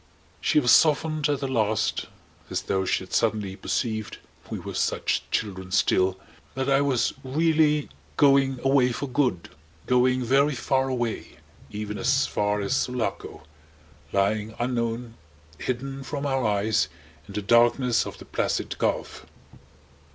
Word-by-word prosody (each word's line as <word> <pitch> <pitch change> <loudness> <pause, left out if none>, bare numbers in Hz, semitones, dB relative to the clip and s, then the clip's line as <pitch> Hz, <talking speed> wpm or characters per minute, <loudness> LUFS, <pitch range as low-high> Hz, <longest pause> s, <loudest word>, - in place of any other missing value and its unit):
She - - +3
was 125 -4 +3
softened 155 -1 +4
at 145 -1 0
the 135 - -1
last 110 -4 0 0.4
as - - -2
though 95 -1 -1
she 95 - 0
had 95 - -12
suddenly 105 -4 0
perceived 110 +1 -3 0.3
(we - - -4
were - - -7
such - - 0
children 95 -3 -3
still!) 95 -1 +2 0.4
that 130 0 -2
I 135 0 +4
was 135 -4 +1
really 150 +1 +2 0.3
going 135 -2 +4
away 135 -2 +3
for 140 - -3
good, 125 -9 -1 0.4
going 125 0 +2
very 135 +4 +3
far 130 +2 0
away 120 -3 -3 0.3
even 105 0 -5
as 135 +2 +2
far 105 0 0
as 100 +6 0
Sulaco, 125 -3 -3 0.7
lying 105 +2 0
unknown, 115 -1 -2 0.4
hidden 135 +2 -4
from 140 +1 -4
our 135 -4 +1
eyes 105 -4 +1 0.4
in 100 - -10
the 105 - -2
darkness 120 +2 +3
of - - -8
the - - -12
Placid - - -2
Gulf. - - -2
125 Hz, 140 wpm, -25 LUFS, 105-135 Hz, 0.7 s, softened